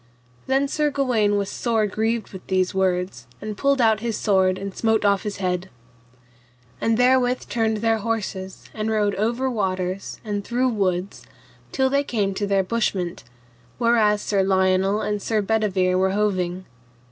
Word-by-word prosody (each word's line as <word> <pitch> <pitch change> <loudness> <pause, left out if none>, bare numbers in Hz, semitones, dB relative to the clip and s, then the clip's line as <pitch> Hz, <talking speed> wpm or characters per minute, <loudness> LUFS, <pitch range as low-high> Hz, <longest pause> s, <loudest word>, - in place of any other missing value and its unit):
Then 270 +1 +2
Sir 300 +1 0
Gawaine 245 -7 +1
was 200 -1 -1
sore 225 -3 0
grieved 220 +2 -1
with 190 - -10
these 185 -1 +1
words, 180 -9 -1
and 210 0 -5
pulled 275 +4 +1
out 220 -3 +4
his 230 -1 -2
sword 190 -3 +2
and 195 0 -6
smote 220 -2 +1
off 200 -1 +3
his 210 -1 -5
head. 185 -1 -2 1.1
And 225 0 +2
therewith 250 0 +2
turned 220 -2 0
their 225 +1 +1
horses 200 -4 -4
and 215 0 -2
rode 210 -2 +1
over 235 +6 0
waters 190 -5 -2
and 205 -1 -2
through 250 +4 0
woods 190 -4 -1 0.5
till 265 -1 +1
they 280 +1 +2
came 205 -7 -1
to 205 +1 -2
their 195 -1 +2
bushment, 190 -4 -2 0.5
whereas 225 -3 +3
Sir 200 -2 +1
Lionel 190 +1 +2
and 210 -1 -2
Sir 220 +1 0
Bedivere 200 -3 +1
were 190 0 +2
hoving. 185 -3 -1
210 Hz, 160 wpm, -23 LUFS, 190-230 Hz, 1.1 s, out